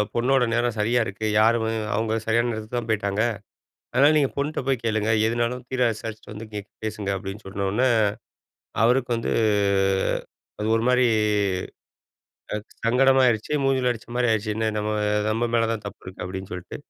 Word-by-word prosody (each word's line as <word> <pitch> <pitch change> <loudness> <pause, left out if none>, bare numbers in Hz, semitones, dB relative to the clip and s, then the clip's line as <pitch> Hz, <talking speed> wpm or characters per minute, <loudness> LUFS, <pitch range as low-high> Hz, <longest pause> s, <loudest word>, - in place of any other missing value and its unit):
பொண்ணோட 125 +2 +3
நேரம் 120 -1 +1
செரியா 120 +3 +2
இருக்கு. 105 +3 -5
யாருமே 110 0 +3 0.2
அவங்க 110 +1 0
செரியான 115 +2 +2
நேரத்துக்கு 110 +2 -5
தான் 120 -1 -3
போய்ட்டாங்க. 100 -1 0 0.7
அதனால 140 +5 +5
நீங்க 140 -2 +2
பொண்ட்ட 145 0 -1
போய் 130 -4 0
கேளுங்க. 110 -1 0 0.2
எதுனாலும் 120 +2 -1
தீர 130 -1 -2
விசாரிச்சுட்டு 110 0 -8
வந்து 110 +1 -8
இங்க 105 -1 -5 0.2
பேசுங்க. 105 -2 -3
அப்டின்னு 95 +2 -7
சொன்ன 95 0 -3
உடனே, 125 +6 +2 1.0
அவருக்கு 125 0 +2
வந்து 115 - -2 1.3
அது 105 - -1
ஒரு 115 - -1
மாரி 125 0 +4 1.5
ஆ, - - 0 0.3
சங்கடமாயிடுச்சு. 130 0 +3
மூஞ்சுல 130 -2 +2
அடிச்ச 115 -1 -5
மாரி 125 0 +2
ஆயிடுச்சு, 110 -1 0
என்ன 110 0 0
நம்ம 105 +1 -1 0.4
நம்ம 115 +2 0
மேல 115 -1 +3
தான் 110 -2 -5
தப்பு 100 +1 -8
இருக்குனு, 95 - -8
அப்டின்னு 95 +1 -6
சொல்ட்டு. 90 0 -7
115 Hz, 155 wpm, -24 LUFS, 105-125 Hz, 1.5 s, அதனால